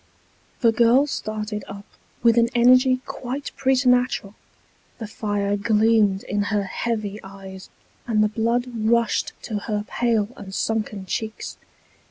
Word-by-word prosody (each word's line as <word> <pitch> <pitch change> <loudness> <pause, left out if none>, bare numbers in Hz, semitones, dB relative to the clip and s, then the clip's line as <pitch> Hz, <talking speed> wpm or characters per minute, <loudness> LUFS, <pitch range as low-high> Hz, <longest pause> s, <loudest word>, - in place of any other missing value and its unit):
The 230 - +5
girl 235 +5 +4
started 215 -5 -4
up, 200 +1 -9 0.4
with 230 -1 +5
an 235 0 +4
energy 255 +2 +5
quite 265 +3 -5
preternatural; 250 -6 +2 0.6
the 225 - -6
fire 205 -1 -2
gleamed 210 -1 +2
in 205 +1 -1
her 205 -1 0
heavy 210 +1 -3
eyes, 195 -1 -11 0.4
and 215 -2 +3
the - - +4
blood 230 +3 0
rushed 230 +1 +1
to 215 -3 -3
her 210 0 -3
pale 225 -4 0
and 195 -4 -9
sunken 215 -3 -2
cheeks. 220 +3 -5
220 Hz, 130 wpm, -23 LUFS, 205-235 Hz, 0.6 s, The